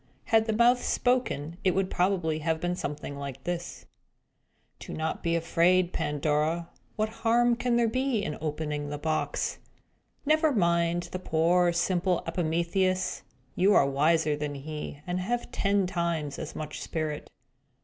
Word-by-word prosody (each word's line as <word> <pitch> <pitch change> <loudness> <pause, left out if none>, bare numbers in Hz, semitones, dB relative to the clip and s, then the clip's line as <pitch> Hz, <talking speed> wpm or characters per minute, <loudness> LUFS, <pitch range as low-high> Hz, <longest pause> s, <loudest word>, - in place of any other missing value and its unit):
Had 220 0 +3
the 220 - +1
mouth 240 +3 +4
spoken, 210 - 0
it 185 - +2
would 190 -1 0
probably 175 -4 +1
have 160 +1 0
been 175 +1 -1
something 145 -3 -5
like 135 -2 -6
this: 175 0 -4 0.9
"Do - - -7
not 160 0 -2
be 170 0 0
afraid, 170 +2 +2
Pandora! 155 +2 0 0.3
What 215 0 0
harm 240 +1 +4
can 245 0 0
there 235 -1 +3
be 255 -2 0
in 150 - -3
opening 150 -1 -3
the 145 - -4
box? 155 +1 -1 0.7
Never 310 +1 +3
mind 170 -3 +2
that 185 0 -6
poor, 175 +2 +3
simple 175 +1 +1
Epimetheus! 170 +3 0 0.3
You 195 +3 +4
are - - +6
wiser 150 +2 +2
than 145 -1 -4
he, 150 0 -6
and 180 0 -2
have 240 +6 -2
ten 200 -1 +1
times 170 -5 -2
as - - -6
much 155 -1 -6
spirit. 155 -2 -3
170 Hz, 150 wpm, -28 LUFS, 155-195 Hz, 0.9 s, are